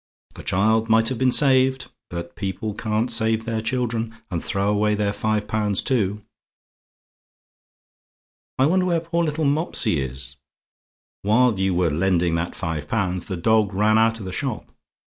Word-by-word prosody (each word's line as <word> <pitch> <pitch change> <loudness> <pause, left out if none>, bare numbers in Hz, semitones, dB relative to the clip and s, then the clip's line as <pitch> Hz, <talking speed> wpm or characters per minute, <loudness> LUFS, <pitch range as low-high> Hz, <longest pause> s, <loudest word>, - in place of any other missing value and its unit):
The - - -10
child 110 +4 +1
might 115 0 +4
have 130 - -4
been 130 -1 +3
saved; 130 -1 +3 0.2
but 85 0 -7
people 100 +2 -4
can't 110 +3 -1
save 110 -1 +1
their 115 -2 -2
children 115 -1 -2 0.2
and 85 -2 -3
throw 100 0 -1
away 105 0 +2
their 105 -1 -1
five 105 0 -1
pounds 105 -3 0
too. 105 -5 0 2.3
"I 130 - +4
wonder 180 +4 +2
where 170 -2 +2
poor 170 +1 -1
little 155 -1 -1
Mopsy 140 - +2
is! 65 +1 -6 0.8
While 110 +1 +3
you 95 -1 +1
were 85 -2 +1
lending 85 +1 +1
that 85 +1 -2
five 80 -4 -4
pounds, 90 -4 -1
the 95 - -4
dog 105 +1 +2
ran 110 +2 +3
out 115 0 +2
of 105 - -8
the 95 - -5
shop. 90 - -3
110 Hz, 160 wpm, -22 LUFS, 95-120 Hz, 2.3 s, might